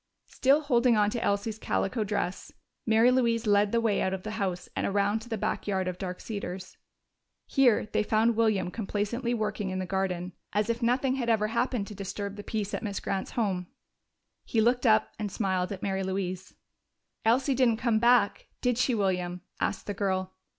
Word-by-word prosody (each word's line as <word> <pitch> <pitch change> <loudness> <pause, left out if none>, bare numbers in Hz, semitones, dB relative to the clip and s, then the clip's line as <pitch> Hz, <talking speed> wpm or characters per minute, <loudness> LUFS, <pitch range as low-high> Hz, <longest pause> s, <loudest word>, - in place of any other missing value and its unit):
Still 275 +3 +3
holding 245 -5 +3
on 210 0 +3
to 235 - -2
Elsie's 205 +2 -1
calico 215 +3 -1
dress, 200 -3 -3 0.4
Mary 225 +3 +5
Louise 235 -2 +2
led 205 -1 +3
the 235 - +2
way 225 -3 +1
out 190 0 0
of 185 - -9
the 215 - -4
house 190 -5 -2
and - - 0
around 200 +2 +1
to 230 +2 -12
the 225 - -2
back 195 - -2
yard 190 -2 0
of 180 -1 -4
Dark 180 -1 -4
Cedars. 190 -4 -6 0.7
Here 255 -5 +3
they 215 - 0
found 220 +2 +2
William 215 -5 +1
complacently 230 +4 -2
working 210 -2 -2
in 185 - -3
the 185 - -2
garden, 185 -1 -2 0.2
as 210 +2 +1
if 230 +1 -4
nothing 255 +3 +1
had 240 -3 -1
ever 215 -2 +2
happened 240 -2 0
to 210 - -9
disturb 200 +1 -5
the 205 - -8
peace 210 -2 -3
at - - -2
Miss 200 -2 -3
Grant's 190 -1 -3
home. 190 -6 -1 0.8
He 230 - -1
looked 245 +3 +3
up 215 -1 +4
and 210 -2 -3
smiled 185 -3 -1
at 195 -1 -6
Mary 195 -1 -1
Louise. 185 -1 -3 0.7
"Elsie 255 +5 +3
didn't 245 -3 +3
come 230 -2 +1
back, 240 -2 +3
did 245 -1 0
she, 250 -1 +2
William?" 180 -3 -1 0.2
asked - - -1
the 205 - -3
girl. 190 -2 -1
210 Hz, 190 wpm, -28 LUFS, 190-235 Hz, 0.8 s, Mary